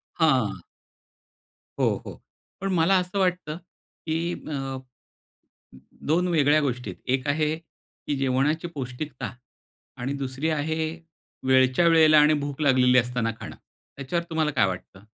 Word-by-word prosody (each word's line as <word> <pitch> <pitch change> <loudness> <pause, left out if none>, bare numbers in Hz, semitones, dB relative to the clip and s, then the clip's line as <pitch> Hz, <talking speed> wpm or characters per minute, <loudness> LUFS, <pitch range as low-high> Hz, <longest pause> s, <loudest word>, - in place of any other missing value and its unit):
हां. 125 - +2 1.2
हो, - - +1
हो. - - -9 0.4
पण 195 0 -1
मला 175 +2 +4
असं 180 +2 -2
वाटतं, 180 -4 0 0.5
की 165 +1 -1 0.2
अ, 135 -2 -3 1.3
2 175 +4 +2
वेगळ्या 155 -3 +4
गोष्टी 125 -4 -2
आहे - - -12
एक 130 +1 -1
आहे 155 +1 +1
की 160 -2 -9
जेवणाची 135 +5 +1
पौष्टिकता 125 -3 -5 0.6
आणि 125 +3 -3
दुसरी 135 +4 -2
आहे, 160 +1 -1 0.6
वेळच्या 130 +4 +4
वेळेला 160 -2 +6
आणि 150 +1 +5
भूक 145 0 -5
लागलेली 130 -3 +5
असताना 120 -1 0
खाणं. 110 - -8 0.4
त्याच्यावर 155 +5 -2
तुम्हाला 160 -2 +1
काय 135 - +3
वाटतं? 95 +1 -7
145 Hz, 125 wpm, -25 LUFS, 130-160 Hz, 1.3 s, वेळेला